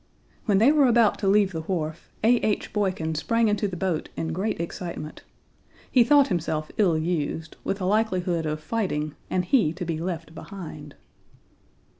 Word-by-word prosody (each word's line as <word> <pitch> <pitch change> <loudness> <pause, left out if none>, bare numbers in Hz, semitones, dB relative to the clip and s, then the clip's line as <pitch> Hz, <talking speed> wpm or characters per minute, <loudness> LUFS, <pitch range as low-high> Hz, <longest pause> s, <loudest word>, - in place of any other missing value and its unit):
When 205 -4 +3
they 230 +8 +6
were 295 -3 +5
about 235 -3 +4
to 200 - -1
leave 200 0 +4
the 160 -2 -4
wharf 160 -2 -4
A. 240 +2 +5
H. 215 -3 -1
Boykin 185 -6 0
sprang 230 +8 +1
into 210 0 +1
the 185 -2 -5
boat 175 -3 -1
in 160 0 -2
great 195 +4 -2
excitement. 170 -2 -5 0.7
He 250 - +6
thought 285 +2 +5
himself 160 -4 -2
ill 180 -6 +4
used, 160 -1 -2
with 195 - -2
a 185 - -2
likelihood 185 -5 +1
of 155 0 -3
fighting 155 -6 -2 0.2
and 180 -1 0
he 180 - +3
to 180 +1 -5
be 165 -2 -2
left 165 -2 -4
behind! 160 -4 -9
180 Hz, 170 wpm, -25 LUFS, 160-210 Hz, 0.7 s, they